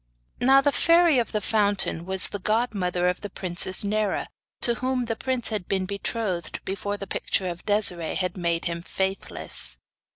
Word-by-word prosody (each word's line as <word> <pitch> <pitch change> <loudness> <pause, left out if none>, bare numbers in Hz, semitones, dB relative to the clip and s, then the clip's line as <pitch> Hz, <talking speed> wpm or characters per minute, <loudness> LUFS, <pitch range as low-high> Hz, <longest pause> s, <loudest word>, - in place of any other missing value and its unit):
Now 270 +2 +6
the 285 +1 +2
Fairy 335 -2 +4
of 235 - -2
the 215 - -1
Fountain 205 -5 0
was 190 0 +3
the 205 - -5
godmother 195 -5 0
of 180 0 -1
the 205 - -6
princess 185 0 -2
Nera, 210 0 0 0.4
to 240 - +3
whom 255 -1 0
the 225 -1 -2
prince 255 +1 -1
had 210 -5 -3
been 190 -1 0
betrothed 200 -3 -3
before 200 +1 -3
the 200 - -6
picture 190 -1 -1
of 175 +2 -7
Desiree 190 -6 +3
had 185 -1 -1
made 170 -2 0
him 170 0 -2
faithless. 190 +2 -1
200 Hz, 170 wpm, -25 LUFS, 180-225 Hz, 0.4 s, Now